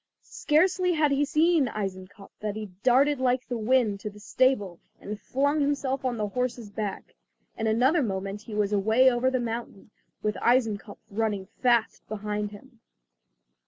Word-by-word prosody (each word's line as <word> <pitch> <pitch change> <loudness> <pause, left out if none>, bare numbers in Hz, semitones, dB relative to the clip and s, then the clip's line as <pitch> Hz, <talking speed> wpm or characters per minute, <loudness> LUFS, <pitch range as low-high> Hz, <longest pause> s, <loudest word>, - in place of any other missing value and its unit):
Scarcely 360 +3 +2
had 305 -3 +2
he 280 +1 +2
seen 310 0 +3
Eisenkopf 195 -1 -6
than 210 -1 -3
he 215 -3 -6
darted 270 +3 +4
like 255 0 +1
the 245 - -3
wind 220 -3 +2
to 210 - -5
the 210 0 -14
stable 215 -4 +1 0.2
and 210 0 -7
flung 285 +6 0
himself 280 -2 -1
on 250 -2 -1
the 210 -1 -2
horse's 245 -2 -3
back. 205 -1 -5 0.4
In 225 - -2
another 255 +9 +3
moment 195 -3 -3
he 215 -1 -8
was 210 -1 0
away 220 +6 +4
over 245 +1 +1
the 260 -1 0
mountain, 230 -3 -5 0.3
with 210 0 -1
Eisenkopf 225 -4 +1
running 205 -2 -1 0.2
fast 240 -3 +2
behind 210 0 -3
him. 230 +4 -15
230 Hz, 160 wpm, -27 LUFS, 210-260 Hz, 0.4 s, darted